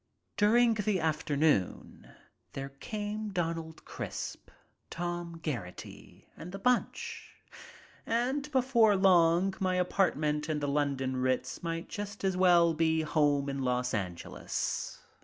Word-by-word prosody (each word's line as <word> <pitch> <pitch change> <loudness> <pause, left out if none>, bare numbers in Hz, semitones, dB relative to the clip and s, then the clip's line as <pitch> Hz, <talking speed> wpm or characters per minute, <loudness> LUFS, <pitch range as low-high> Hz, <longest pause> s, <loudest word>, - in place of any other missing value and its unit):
During 230 +3 +4
the 210 -3 0
afternoon 150 - 0 0.4
there 135 0 -5
came 210 - -5
Donald 165 -3 -3
Crisp, - - -6 0.4
Tom 175 -1 -4
Geraghty 115 - -7
and 180 - -9
the 195 - -6
bunch, 250 +5 -1 0.7
and 265 +6 -1
before 245 -5 +4
long 185 -1 +4
my 185 -1 +1
apartment 155 -5 +1
in 155 -1 0
the 145 - -2
London 140 -2 0
Ritz 130 0 -1
might 165 -1 -3
just 205 0 -6
as 190 -1 +1
well 175 -2 +5
be 160 0 +2
home 145 -2 +2
in 135 -1 -3
Los 125 -1 0
Angeles. 90 -5 -4
165 Hz, 120 wpm, -30 LUFS, 145-200 Hz, 0.7 s, well